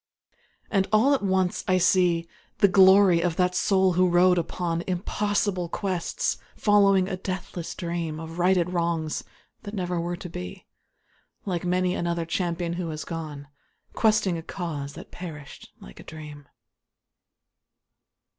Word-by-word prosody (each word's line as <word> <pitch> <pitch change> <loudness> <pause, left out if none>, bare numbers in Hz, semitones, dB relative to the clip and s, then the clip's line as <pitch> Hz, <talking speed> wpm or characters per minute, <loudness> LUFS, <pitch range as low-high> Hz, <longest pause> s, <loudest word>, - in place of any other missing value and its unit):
And 195 -2 +2
all 225 +7 +4
at 275 - +1
once 190 -2 0
I 185 - +3
see 175 -2 +3 0.3
The 205 -1 +5
glory 190 -2 +6
of 170 -1 0
that 180 0 +1
soul 190 0 +2
who 180 +1 +3
rode 180 +1 +4
upon 170 0 -2
Impossible 190 0 -1
quests, 185 -2 -2 0.2
following 200 -3 +4
a 190 - -2
deathless 185 -2 -5
dream 170 -3 -3
Of 165 +1 -8
righted 180 -1 +2
wrongs, 170 -3 -1 0.4
that 205 0 -7
never 180 -3 -2
were 175 +1 -3
to 180 - -8
be, 90 - -8 0.8
Like 180 -3 -2
many 180 0 +1
another 170 -2 -2
champion 170 0 -2
who 175 -1 -3
has 155 -2 -5
gone 155 -4 -6 0.5
Questing 215 -6 +2
a - - -6
cause 155 -5 -5
that - - -11
perished 150 -6 -9
like - - -13
a - - -10
dream. 150 -2 -10
180 Hz, 140 wpm, -25 LUFS, 165-190 Hz, 0.8 s, glory